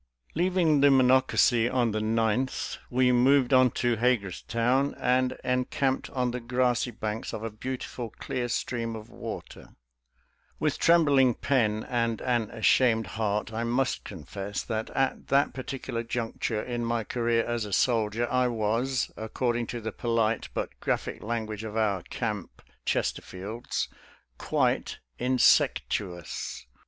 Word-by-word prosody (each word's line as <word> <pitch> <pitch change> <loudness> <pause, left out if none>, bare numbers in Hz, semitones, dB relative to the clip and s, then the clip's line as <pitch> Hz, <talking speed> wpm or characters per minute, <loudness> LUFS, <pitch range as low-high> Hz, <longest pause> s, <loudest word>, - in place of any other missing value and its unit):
Leaving 170 -4 +2
the 145 - +7
Monocacy 130 -2 +4
on 125 -3 +1
the 110 - -1
9th, 115 +3 0
we 125 0 +3
moved 130 +1 +4
on 130 0 +6
to 120 0 0
Hagerstown, 120 +3 +1
and 130 +1 +1
encamped 125 +1 0
on 125 -2 -1
the 125 - -3
grassy 125 0 +1
banks 110 -1 -4
of 110 - -6
a 115 - -3
beautiful 125 +1 -5
clear 120 +2 -4
stream 115 -1 -2
of 110 -1 -10
water - - -8 0.8
With - - 0
trembling 140 -7 +5
pen 110 -6 +1
and 115 -2 0
an 120 -4 0
ashamed 115 0 +3
heart, 105 -1 -1
I 115 +1 -2
must 125 +3 0
confess 100 +3 -6
that 110 -1 -3
at 135 -1 -1
that 140 +1 +3
par 130 - -6
ticular 115 -3 -4
juncture 115 -2 -2
in 120 -1 -3
my 115 -1 0
career 115 0 0
as 120 -1 -1
a 105 - -7
soldier 115 +1 +1
I 125 0 +3
was, 120 +3 0
according 120 +1 -2
to 120 +1 -5
the 110 0 -4
polite 115 -1 0
but - - -4
graphic - - -2
language 110 -1 -3
of 110 0 -5
our 100 -4 +1
camp 105 0 -5 0.2
Chesterfields, 100 +6 -2 0.3
" - - -34
quite - - 0 0.2
insectuous." 100 - +1
120 Hz, 140 wpm, -28 LUFS, 110-125 Hz, 0.8 s, the